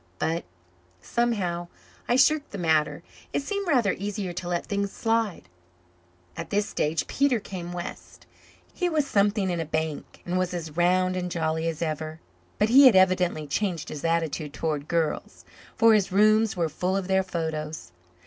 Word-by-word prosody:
But, 165 - -1 0.5
somehow, 180 - -1 0.4
I 240 - +4
shirked 295 +3 +3
the 205 - -7
matter. 160 -4 +1 0.3
It - - 0
seemed 400 +4 -3
rather 245 - +3
easier 200 -2 -4
to 175 0 -5
let 175 -1 -1
things 200 -1 -2
slide. 225 -4 -1 0.9
At - - -6
this 205 +1 0
stage 155 +1 -1
Peter 275 -4 +1
came 180 -4 -7
west. 175 0 -8 0.5
He 360 -1 0
was 310 -3 +1
something 200 -4 +1
in 175 - -2
a - - 0
bank, 160 -1 -4
and 180 +1 -1
was 180 -1 -1
as 160 -3 -6
round 185 +1 +2
and 180 -1 -2
jolly 160 -1 -1
as 165 0 -2
ever; 155 0 -4 0.4
but 210 - +2
he 270 +3 +9
had 245 - +6
evidently 180 -4 +3
changed 170 +2 -2
his 150 - -7
attitude 165 -3 -1
towards 150 -2 -2
girls, 165 -2 -2 0.3
for 225 0 +6
his 200 -3 +2
rooms 215 +1 +4
were 170 -2 +1
full 180 +5 -1
of 190 -2 -3
their 190 0 +3
photos. 160 - -4
180 Hz, 170 wpm, -26 LUFS, 160-210 Hz, 0.9 s, he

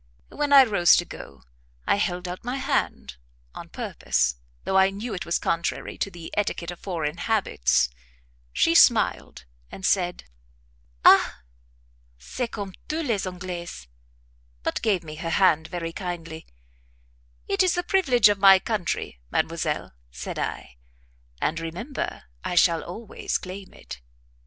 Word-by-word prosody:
When 295 -1 -2
I 275 -1 +10
rose 200 -8 +5
to 175 - +1
go, 70 - -11 0.4
I - - +3
held 180 -3 -1
out 180 +1 -6
my 245 +2 -3
hand, 65 - -2 0.4
on - - -9
purpose, 65 -1 -1 0.3
though 190 - -2
I 190 0 +6
knew 210 +4 -5
it 180 - -5
was 170 - +2
contrary 170 0 -2
to - - -1
the 170 -3 -10
etiquette 180 -4 -1
of 175 - -10
foreign 165 -4 -3
habits; 185 - +1 0.6
she - - +3
smiled, 60 - +3 0.3
and 190 - -7
said 180 -2 +1 0.8
"Ah! - - +6 0.7
c'est 245 - -4
comme 200 -4 -6
tous 320 +1 -2
les 210 -7 -1
Anglais," 180 -1 -6 0.9
but - - -2
gave 200 -6 +1
me 155 -1 -9
her 165 +1 -4
hand 160 -3 +3
very 165 -2 -5
kindly. 165 -4 -6 1.0
"It - - +1
is 365 -2 +3
the 355 - -1
privilege 270 - +4
of 205 -1 +1
my 195 -1 +8
country, 190 - -3
Mademoiselle," - - -1 0.2
said - - -6
I; - - -5 0.6
"and, 165 +2 -1
remember, 175 - -5 0.2
I - - -3
shall 170 -1 +4
always 215 +5 -4
claim 190 +1 -9
it." 60 - -10
180 Hz, 140 wpm, -25 LUFS, 165-205 Hz, 1.0 s, I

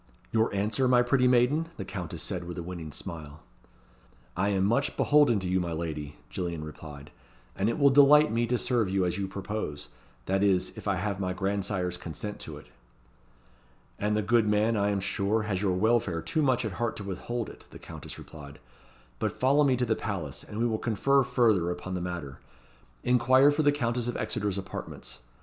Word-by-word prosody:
"Your 110 0 +2
answer, 105 +6 0
my 125 -1 +5
pretty 125 +1 +3
maiden?" 130 +7 +3
the 95 - -5
Countess 90 -4 -5
said, 90 -3 -4
with 85 0 -7
a 85 - -4
winning 85 -3 -7
smile. 80 -3 -8 0.9
"I 100 - +1
am 95 -2 +1
much 140 +7 +1
beholden 145 -7 +4
to 95 - -3
you, 95 +1 +1
my 85 -2 -2
lady," 75 -3 -4 0.2
Gillian 85 -3 -3
replied, 75 -1 -10 0.4
"and 100 +3 +1
it 115 - -1
will 140 -2 +5
delight 145 +1 +7
me 115 +1 +1
to 125 +1 +1
serve 120 -5 +1
you 95 -1 +1
as 90 +2 -1
you 100 - -2
propose 95 - -5 0.4
that 95 +1 0
is, 95 -3 +2
if - - -8
I 100 - +2
have 100 +1 -2
my 90 -1 -1
grandsire's 95 -1 -1
consent 100 +5 -6
to - - -8
it." - - -13 1.3
"And 105 +1 +1
the 105 - 0
good 115 +1 +3
man, 105 +2 +2
I 100 -1 +1
am 100 -1 0
sure, 100 +3 0
has 100 -3 -2
your 95 -3 +1
welfare 100 -4 +1
too 160 - 0
much 130 -4 +2
at 110 - -2
heart 115 +5 -2
to 105 - -6
withhold 110 +4 -4
it," - - -12
the - - -11
Countess - - -8
replied. 70 -3 -11 0.6
"But - - -2
follow 140 +3 +4
me 130 -3 +3
to 125 - +1
the 110 -1 +1
palace, 95 -11 -4
and 105 - -9
we 115 - +1
will 110 -2 0
confer 135 +5 +2
further 110 -9 +2
upon 95 +1 -5
the 90 - -2
matter. 85 -7 -5 0.6
Inquire 130 +3 +5
for 145 +2 0
the 145 -1 +4
Countess 120 -4 -1
of 120 - -2
Exeter's 105 -2 -1
apartments." 65 -9 -7
100 Hz, 200 wpm, -28 LUFS, 90-120 Hz, 1.3 s, delight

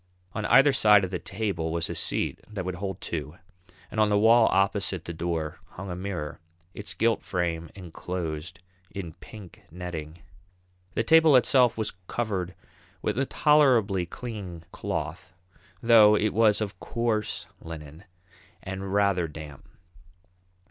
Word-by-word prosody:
On 110 - -3
either 135 +3 +6
side 105 -5 +6
of 95 - -3
the 90 - -2
table 95 -3 -3
was 85 0 -1
a - - -4
seat - - -1
that 100 -4 -5
would 95 - -2
hold 95 -2 -4
two, 75 0 -5 0.5
and 110 - -3
on 105 -1 +4
the 105 - +3
wall 115 +2 +6
opposite 95 -2 0
the 85 - -5
door 80 -2 -3
hung 95 0 -7
a - - -3
mirror, 90 -5 -5 0.3
its 105 - -5
gilt 115 0 +2
frame 85 -2 -2
enclosed 85 -2 -5 0.3
in 90 -5 -7
pink 105 -1 -13
netting. 85 -2 -7 0.7
The 115 - +1
table 160 +3 +6
itself 125 -1 +4
was 110 -1 -2
covered 95 -6 -2 0.5
with - - -1
a 135 - 0
tolerably 120 - +3
clean 95 -7 -7
cloth, 90 - -5 0.5
though 110 -3 +7
it 105 0 +1
was 110 -1 +4
of 105 -1 -4
coarse 115 -3 -1 0.2
linen 80 0 -9 0.6
and 95 0 -5
rather 100 -4 +2
damp. 75 -2 -11
95 Hz, 140 wpm, -27 LUFS, 85-110 Hz, 0.7 s, though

